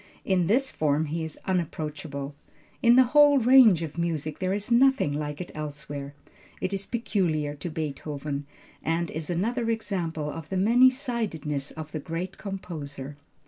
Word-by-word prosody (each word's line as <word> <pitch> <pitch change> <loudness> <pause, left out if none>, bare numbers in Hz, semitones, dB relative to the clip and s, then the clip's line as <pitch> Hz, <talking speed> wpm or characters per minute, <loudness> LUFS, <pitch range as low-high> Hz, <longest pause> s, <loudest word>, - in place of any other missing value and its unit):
In 180 -3 +2
this 260 +7 +2
form 150 0 +1
he 160 +2 -3
is 160 -1 -5
unapproachable. 150 -5 -3 0.5
In 235 0 +6
the 260 - +8
whole 290 -1 +7
range 240 -8 +6
of 160 +1 -6
music 155 -3 -2
there 185 0 0
is 205 +3 -2
nothing 260 - +4
like 150 0 -4
it 180 - -6
elsewhere. 145 -2 -6 0.4
It 185 - -2
is 195 0 -2
peculiar 170 -11 0
to 160 +5 -5
Beethoven, 145 -2 -4 0.3
and 165 +1 -1
is 160 +1 -4
another 225 +7 0
example 180 -9 -2
of 160 -1 -8
the 190 - -2
many 235 +7 +6
sidedness 205 - -3
of 155 -1 -8
the 155 - -3
great 170 +5 -5
composer. 150 -8 -6
165 Hz, 155 wpm, -27 LUFS, 150-210 Hz, 0.5 s, the